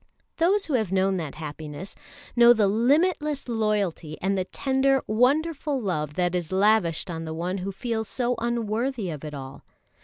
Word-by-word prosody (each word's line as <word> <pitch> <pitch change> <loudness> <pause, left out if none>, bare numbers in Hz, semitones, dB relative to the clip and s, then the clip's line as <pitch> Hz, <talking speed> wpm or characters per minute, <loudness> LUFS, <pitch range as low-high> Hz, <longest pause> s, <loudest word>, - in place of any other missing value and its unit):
Those 380 +5 +2
who 305 - -4
have 220 -7 +1
known 190 0 +2
that 155 -5 -5
happiness, 155 +3 -7 0.4
know 240 0 +8
the 215 -3 +2
limitless 290 - +1
loyalty 210 -9 -1
and 195 +2 0
the 185 -1 -1
tender, 270 +3 +1
wonderful 285 +5 +1
love 150 - -2
that 180 0 +1
is 175 -2 -2
lavished 190 -4 +2
on 165 -1 -5
the 160 0 -5
one 180 +4 -2
who 190 +2 -3
feels 220 +1 -3
so 250 +1 0
unworthy 235 -2 -1
of 150 -2 -7
it 150 -1 -6
all. 135 0 -8
210 Hz, 165 wpm, -25 LUFS, 175-250 Hz, 0.4 s, know